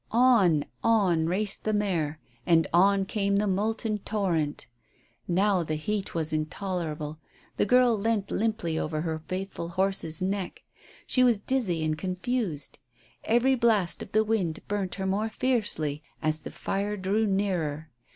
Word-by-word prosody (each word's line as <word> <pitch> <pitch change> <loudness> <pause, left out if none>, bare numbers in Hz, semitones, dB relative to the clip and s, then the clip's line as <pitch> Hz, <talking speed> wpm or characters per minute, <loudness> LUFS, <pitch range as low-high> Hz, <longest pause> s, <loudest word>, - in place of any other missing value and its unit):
On, 225 - +4 0.2
on 185 -8 +3
raced 195 +3 -1
the 215 - 0
mare, 170 -8 0 0.2
and 165 +1 +4
on 195 +2 +4
came 200 0 0
the 205 +1 +2
molten 215 +2 -1
torrent. 175 -9 -1 0.6
Now 190 +1 +2
the 155 -1 -2
heat 200 +6 -3
was 160 -1 0
intolerable. 155 -1 -3 0.4
The - - +2
girl 250 0 +5
leant 210 -1 -1
limply 210 -7 -1
over 155 0 -2
her 160 -1 -3
faithful 185 -2 -4
horse's 185 -3 0
neck; 190 0 -3 0.4
she 255 - +3
was 240 -4 +4
dizzy 200 -9 -1
and 155 0 0
confused. 185 - -3 0.5
Every 240 +4 +3
blast 225 -8 +2
of - - -8
the 215 +1 +3
wind 205 -7 -1
burnt 200 -3 -2
her 190 - -3
more 205 +4 0
fiercely 205 - 0 0.2
as 155 0 -1
the - - -7
fire 205 +2 -2
drew 205 +3 +1
nearer. 170 -6 -1
195 Hz, 145 wpm, -27 LUFS, 165-215 Hz, 0.6 s, girl